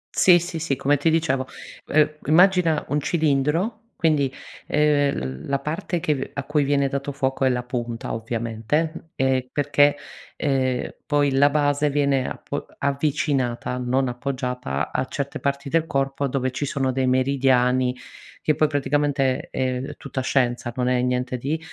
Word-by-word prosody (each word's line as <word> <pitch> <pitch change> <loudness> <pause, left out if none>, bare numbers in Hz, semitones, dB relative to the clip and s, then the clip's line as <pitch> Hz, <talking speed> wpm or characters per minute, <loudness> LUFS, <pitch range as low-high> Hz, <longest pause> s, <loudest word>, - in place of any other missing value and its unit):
Sì, 180 -2 +7
sì, 175 -1 -4
sì, 155 -3 -1
come 140 +2 +2
ti 145 +4 +2
dicevo 155 -5 +1 0.4
uhm, 155 0 +2
immagina 175 -1 +4
un 145 +2 +1
cilindro 160 - +1 0.2
quindi, 145 -5 +3 0.4
ehm, 145 - +1
la 140 0 0
parte 160 +4 -3
che 145 -4 -1
a 140 - -3
cui 150 +1 +1
viene 140 -1 +2
dato 140 +1 -3
fuoco 135 -1 0
è - - +4
la 125 -1 -1
punta 120 -1 -4
ovviamente, 115 +9 -2
ehm, 130 -1 +1
perché, 145 0 +3 0.4
ehm, 130 -3 0
poi 145 -1 +2
la 140 +2 +5
base 145 0 +1
viene 140 -2 +1
apo 145 - -5
avvicinata, 140 -3 0
non 125 +1 0
appoggiata 125 - -3
a - - -1
certe 140 0 -4
parti 140 0 -2
del 165 +2 +1
corpo 135 -1 -1
dove 130 -1 -1
ci 145 - -3
sono 135 -1 -1
dei 130 0 0
meridiani, 130 -1 +2 0.5
che 155 - +1
poi 155 +1 +3
praticamente, 145 -2 0
uhm, 130 0 -1
è - - -10
tutta 140 -1 -6
scienza 120 -2 0
non 125 -1 0
è 125 -1 +2
niente 125 0 -1
di 145 +6 -2
140 Hz, 155 wpm, -23 LUFS, 130-150 Hz, 0.5 s, Sì